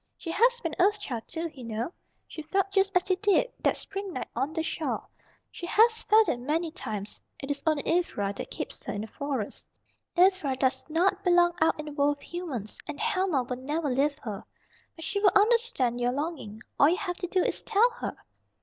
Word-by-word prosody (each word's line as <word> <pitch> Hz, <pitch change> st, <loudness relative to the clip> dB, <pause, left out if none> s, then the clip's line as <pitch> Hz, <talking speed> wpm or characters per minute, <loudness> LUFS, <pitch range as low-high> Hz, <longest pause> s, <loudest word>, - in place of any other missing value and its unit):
She 330 Hz, -, -5 dB
has 485 Hz, +6 st, +4 dB
been 330 Hz, -2 st, -3 dB
an 365 Hz, -, +4 dB
Earth 420 Hz, 0 st, -1 dB
Child, 235 Hz, -, -5 dB
too, 330 Hz, 0 st, -4 dB
you 260 Hz, -, -10 dB
know. 230 Hz, +8 st, -3 dB, 0.3 s
She 315 Hz, -, -7 dB
felt 385 Hz, +5 st, 0 dB
just 390 Hz, -1 st, +3 dB
as 360 Hz, -, 0 dB
you 370 Hz, -, +3 dB
did, 420 Hz, +5 st, +2 dB
that -, -, +2 dB
spring 395 Hz, 0 st, -5 dB
night -, -, -4 dB
on 280 Hz, -, -1 dB
the 320 Hz, 0 st, -2 dB
shore. 325 Hz, -1 st, -3 dB, 0.4 s
She 345 Hz, -, -7 dB
has 450 Hz, +4 st, +4 dB
felt 435 Hz, 0 st, +5 dB
it 240 Hz, -, 0 dB
many 315 Hz, +6 st, -1 dB
times. 210 Hz, -, -6 dB, 0.2 s
It 275 Hz, +1 st, -5 dB
is 285 Hz, -, -2 dB
only 305 Hz, -2 st, +2 dB
Ivra 210 Hz, -, 0 dB
that -, -, -6 dB
keeps -, -, -5 dB
her -, -, -3 dB
in 205 Hz, -, -3 dB
the 220 Hz, -, -5 dB
Forest. 265 Hz, -3 st, -4 dB, 0.5 s
Ivra 365 Hz, -7 st, +4 dB
docs 260 Hz, +2 st, 0 dB
not 370 Hz, +5 st, +2 dB
belong 350 Hz, -1 st, +4 dB
out 320 Hz, -, +3 dB
in 305 Hz, -, -4 dB
the 300 Hz, -, -6 dB
world 290 Hz, 0 st, +1 dB
of -, -, -18 dB
humans, 290 Hz, -, -5 dB
and 300 Hz, -2 st, -6 dB
Helma 370 Hz, -8 st, +1 dB
will 250 Hz, 0 st, -4 dB
never 295 Hz, +4 st, -2 dB
leave 280 Hz, +3 st, +1 dB
her. 210 Hz, -4 st, -5 dB, 0.5 s
But 325 Hz, -, -8 dB
she 395 Hz, +1 st, -1 dB
will 400 Hz, -3 st, +4 dB
understand 415 Hz, -, +3 dB
your 245 Hz, +1 st, +1 dB
longing. 275 Hz, -7 st, -4 dB, 0.2 s
All 285 Hz, -, +7 dB
you 355 Hz, -, +2 dB
have 365 Hz, -4 st, -3 dB
to 360 Hz, -, -3 dB
do 370 Hz, 0 st, +2 dB
is -, -, 0 dB
tell 455 Hz, +3 st, +3 dB
her." -, -, -5 dB
325 Hz, 215 wpm, -28 LUFS, 270-385 Hz, 0.5 s, All